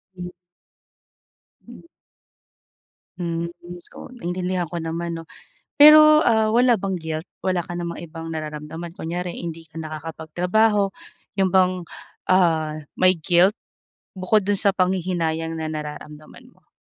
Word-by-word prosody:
Hmm, 180 Hz, -1 st, -7 dB, 1.4 s
hmm. -, -, -13 dB, 1.4 s
Mm. 170 Hz, -1 st, -3 dB, 0.4 s
So -, -, -12 dB
naiintindihan 180 Hz, -5 st, -3 dB
ko 175 Hz, -, -5 dB
naman, 170 Hz, +1 st, -4 dB
'no. 165 Hz, -, -9 dB, 0.5 s
Pero, 305 Hz, +1 st, +8 dB
ah, 220 Hz, -2 st, +3 dB
wala 240 Hz, -1 st, +3 dB
bang 195 Hz, -1 st, -2 dB
guilt? 160 Hz, 0 st, -5 dB, 0.2 s
Wala 185 Hz, -1 st, +1 dB
ka 175 Hz, -, -8 dB
namang 170 Hz, -1 st, -5 dB
ibang 165 Hz, -1 st, -8 dB
nararamdaman, 155 Hz, +2 st, -6 dB
kunwari 175 Hz, 0 st, -4 dB
hindi 165 Hz, -1 st, -7 dB
ka 155 Hz, -, -31 dB
nakakapagtrabaho 175 Hz, +7 st, 0 dB, 0.5 s
'yon 190 Hz, -1 st, +2 dB
bang, 185 Hz, -1 st, +5 dB, 0.6 s
ah, 160 Hz, -4 st, +3 dB, 0.2 s
may 185 Hz, 0 st, +5 dB
guilt 175 Hz, +5 st, +4 dB, 0.6 s
bukod 205 Hz, +3 st, +2 dB
do'n 205 Hz, -, +2 dB
sa 200 Hz, -, +4 dB
panghihinayang 175 Hz, -3 st, -1 dB
na 160 Hz, -1 st, -3 dB
nararamdaman 150 Hz, 0 st, -9 dB
mo? -, -, -32 dB
175 Hz, 120 wpm, -22 LUFS, 160-190 Hz, 1.4 s, Pero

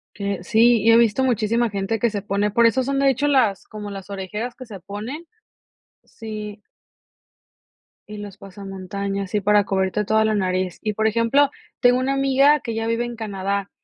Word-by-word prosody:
Que 200 Hz, -3 st, -4 dB
sí, 225 Hz, +1 st, +4 dB
yo 230 Hz, -, +7 dB
he -, -, +7 dB
visto 235 Hz, +2 st, +3 dB
muchísima 230 Hz, -1 st, +1 dB
gente 200 Hz, +2 st, -2 dB
que 235 Hz, +2 st, +1 dB
se 205 Hz, -1 st, -3 dB
pone 200 Hz, +1 st, -1 dB
por 235 Hz, +3 st, +4 dB
eso 240 Hz, +3 st, +2 dB
son 275 Hz, +2 st, -1 dB
de 275 Hz, 0 st, +3 dB
hecho, 270 Hz, +2 st, +1 dB
las 245 Hz, -9 st, +2 dB
como 210 Hz, -1 st, -8 dB
las 195 Hz, -1 st, -9 dB
orejeras 210 Hz, +5 st, -5 dB
que 255 Hz, -, -11 dB
se 210 Hz, -4 st, -9 dB
ponen. 220 Hz, -, -7 dB, 0.8 s
Sí. 210 Hz, -2 st, -8 dB, 1.5 s
Y 210 Hz, 0 st, -8 dB
los 205 Hz, -2 st, -8 dB
pasamontañas, 195 Hz, 0 st, -6 dB
sí 210 Hz, -, 0 dB
para 205 Hz, +1 st, +3 dB
cubrirte 195 Hz, +1 st, 0 dB
toda 220 Hz, +2 st, +2 dB
la 220 Hz, 0 st, +1 dB
nariz. 185 Hz, -2 st, -1 dB
Y 215 Hz, -, -1 dB
por 220 Hz, +1 st, 0 dB
ejemplo, 230 Hz, +6 st, +3 dB, 0.3 s
tengo 245 Hz, 0 st, +4 dB
una 270 Hz, +1 st, 0 dB
amiga 275 Hz, +2 st, +4 dB
que 230 Hz, -, -5 dB
ella 225 Hz, 0 st, -3 dB
vive 230 Hz, +1 st, 0 dB
en 240 Hz, 0 st, -5 dB
Canadá, 200 Hz, -2 st, -3 dB
215 Hz, 185 wpm, -22 LUFS, 200-240 Hz, 1.5 s, yo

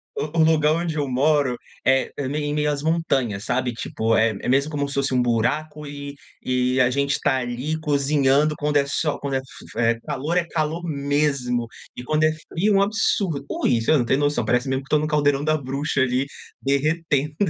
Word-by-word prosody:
o 155 Hz, +2 st, -4 dB
o 160 Hz, -, +6 dB
lugar 155 Hz, -1 st, +4 dB
onde 165 Hz, -1 st, -2 dB
eu 145 Hz, -2 st, -1 dB
moro 135 Hz, -1 st, +2 dB, 0.3 s
é 135 Hz, 0 st, +3 dB
é 140 Hz, -, -2 dB
meio 145 Hz, +2 st, -2 dB
em 145 Hz, -, -1 dB
meio 150 Hz, 0 st, +1 dB
às 145 Hz, -1 st, -3 dB
montanhas, 135 Hz, -10 st, 0 dB
sabe? 125 Hz, -1 st, 0 dB
Tipo, 115 Hz, 0 st, -1 dB
é 110 Hz, +1 st, +4 dB
é -, -, -3 dB
mesmo 140 Hz, +4 st, +2 dB
como 145 Hz, -1 st, -1 dB
se 140 Hz, -, -6 dB
fosse 135 Hz, -1 st, 0 dB
buraco, 135 Hz, +6 st, 0 dB
e 140 Hz, 0 st, -7 dB, 0.3 s
e 125 Hz, 0 st, +1 dB
a 125 Hz, -, +4 dB
gente 140 Hz, +2 st, 0 dB
está 135 Hz, -1 st, +1 dB
ali 130 Hz, +6 st, -3 dB
cozinhando 145 Hz, 0 st, +2 dB
quando 150 Hz, 0 st, +1 dB
é 140 Hz, -, +3 dB
sol 150 Hz, +1 st, -1 dB
quando 140 Hz, -1 st, -3 dB
é -, -, +3 dB
f 130 Hz, -, -5 dB, 0.3 s
f 115 Hz, -, -6 dB
é 115 Hz, 0 st, +2 dB
calor, 155 Hz, +10 st, -2 dB
é 170 Hz, -, +2 dB
calor 160 Hz, +1 st, -2 dB
mesmo, 140 Hz, -5 st, 0 dB, 0.3 s
e 125 Hz, -, -7 dB
quando 155 Hz, +4 st, 0 dB
é 155 Hz, -, +4 dB
frio, 175 Hz, +6 st, -1 dB
é -, -, +5 dB
um 195 Hz, -, +4 dB
absurdo 195 Hz, -8 st, 0 dB
ui, 120 Hz, -2 st, +1 dB
você 115 Hz, -, +1 dB
não 120 Hz, -, +1 dB
tem 130 Hz, -, +2 dB
noção, 145 Hz, -4 st, +1 dB
parece 125 Hz, +4 st, +1 dB
mesmo 130 Hz, 0 st, -1 dB
que -, -, -19 dB
estou 150 Hz, -, +3 dB
no 155 Hz, -, -1 dB
caldeirão 145 Hz, -2 st, +2 dB
da 155 Hz, 0 st, +2 dB
bruxa 140 Hz, +1 st, -2 dB
ali, 130 Hz, +1 st, +1 dB, 0.4 s
derretendo. 150 Hz, +1 st, 0 dB
140 Hz, 215 wpm, -23 LUFS, 130-155 Hz, 0.4 s, o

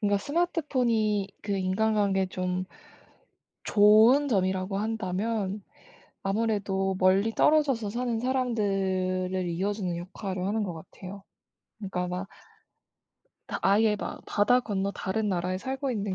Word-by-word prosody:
그러니까 205 Hz, -2 st, +2 dB
스마트폰이 250 Hz, -, 0 dB
그 200 Hz, -1 st, -1 dB
인간관계에 195 Hz, 0 st, +1 dB
좀 185 Hz, 0 st, -2 dB, 1.0 s
좋은 220 Hz, +7 st, +6 dB
점이라고 190 Hz, -3 st, 0 dB
한다면 210 Hz, -1 st, -2 dB, 0.6 s
아무래도 195 Hz, -2 st, 0 dB
멀리 190 Hz, +4 st, +3 dB
떨어져서 270 Hz, -7 st, +2 dB
사는 235 Hz, 0 st, -2 dB
사람들을 190 Hz, -7 st, 0 dB
이어 185 Hz, +4 st, -1 dB
주는 185 Hz, -4 st, -3 dB
역할을 185 Hz, +1 st, -5 dB
하는 215 Hz, +2 st, 0 dB
것 185 Hz, -4 st, -3 dB
같아요. 185 Hz, +4 st, -10 dB, 0.6 s
그니까 185 Hz, -3 st, -3 dB
막 180 Hz, +2 st, -4 dB, 1.2 s
다 -, -, -3 dB
아예 210 Hz, +2 st, +4 dB
막 -, -, -6 dB
바다 215 Hz, +5 st, +3 dB
건너 200 Hz, -4 st, -2 dB
다른 210 Hz, +3 st, -2 dB
나라에 180 Hz, -1 st, -1 dB
살고 265 Hz, +5 st, -3 dB
있는 205 Hz, -4 st, -2 dB
200 Hz, 280 characters per minute, -27 LUFS, 185-225 Hz, 1.2 s, 좋은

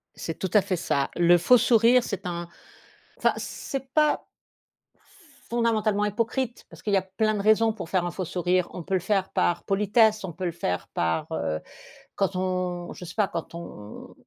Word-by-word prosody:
C'est 165 Hz, -, -6 dB
tout 190 Hz, -, -2 dB
à 210 Hz, -, +6 dB
fait 190 Hz, -1 st, -1 dB
ça. 140 Hz, -5 st, 0 dB
Le 175 Hz, 0 st, +5 dB
faux 245 Hz, +9 st, +6 dB
sourire 235 Hz, +1 st, +5 dB
c'est 200 Hz, -3 st, -5 dB
un 175 Hz, -1 st, -4 dB, 0.7 s
enfin -, -, +2 dB
c'est 270 Hz, -1 st, -5 dB
pas 300 Hz, -1 st, +3 dB, 1.3 s
fondamentalement 220 Hz, -3 st, +1 dB
hypocrite 235 Hz, +4 st, -2 dB
parce -, -, -13 dB
qu'il 205 Hz, -, -2 dB
y -, -, +6 dB
a 185 Hz, -, 0 dB
plein 215 Hz, +3 st, 0 dB
de 200 Hz, -, -1 dB
raisons 220 Hz, +2 st, +4 dB
pour 215 Hz, -6 st, -7 dB
faire 185 Hz, -2 st, +1 dB
un 175 Hz, -, -1 dB
faux 185 Hz, +1 st, -4 dB
sourire. 180 Hz, +1 st, 0 dB
On 180 Hz, -, -5 dB
peut 190 Hz, +3 st, -2 dB
le -, -, +2 dB
faire 190 Hz, +1 st, 0 dB
par 175 Hz, -, 0 dB
politesse. 210 Hz, +2 st, +3 dB
On 180 Hz, -, -4 dB
peut 185 Hz, +2 st, -5 dB
le 170 Hz, -, 0 dB
faire 90 Hz, -, -3 dB
par 80 Hz, -1 st, 0 dB
heu, 80 Hz, 0 st, -2 dB, 0.6 s
quand 195 Hz, -1 st, 0 dB
on 180 Hz, -1 st, -2 dB
je -, -, -10 dB
sais 170 Hz, -, -9 dB
pas, 210 Hz, -3 st, +2 dB
quand 170 Hz, -2 st, -6 dB
on 105 Hz, -11 st, -9 dB
190 Hz, 195 wpm, -26 LUFS, 175-220 Hz, 1.3 s, à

